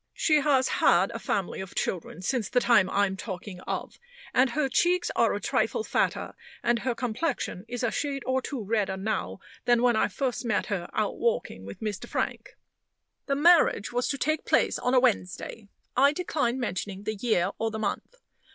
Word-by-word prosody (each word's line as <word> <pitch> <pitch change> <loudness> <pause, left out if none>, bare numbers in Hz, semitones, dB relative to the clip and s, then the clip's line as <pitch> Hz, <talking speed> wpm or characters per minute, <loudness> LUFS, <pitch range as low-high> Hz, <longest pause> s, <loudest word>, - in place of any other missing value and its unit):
She 310 -2 +3
has 270 -2 +3
had 190 -6 +3
a 230 - -5
family 195 -5 -2
of 190 - -9
children 180 0 -3
since 230 -1 -1
the 250 - +3
time 235 -6 +4
I'm 200 -1 +1
talking 190 -2 -7
of; - - -4 0.3
and 255 +1 +4
her 295 +2 0
cheeks 350 +7 +2
are - - +3
a - - -2
trifle 455 - 0
fatter, - - -1 0.3
and 240 0 +2
her 245 0 -1
complexion 235 - -2
is 245 +1 -4
a 235 - +1
shade 280 -3 -2
or 260 0 +1
two 255 -3 -5
redder 200 -2 0
now, 190 - -2 0.3
than 240 0 +3
when 245 -2 +4
I - - +3
first 260 -3 -2
met 220 -4 0
her 185 -5 -3
out 215 - -1
walking 155 - -1
with 100 - -9
Mr. 210 -3 -4
Frank. - - -3 0.7
The 275 - +1
marriage 315 -8 +4
was 245 0 0
to 280 - -1
take 310 +3 0
place - - +2
on 250 +1 +1
a - - +7
Wednesday. 215 -3 -1 0.3
I 280 +3 +5
decline 285 -7 -1
mentioning 200 -3 -4
the 215 - -2
year 210 -4 +1
or 225 - 0
the 220 - -5
month. 220 - -3
235 Hz, 190 wpm, -27 LUFS, 200-265 Hz, 0.7 s, a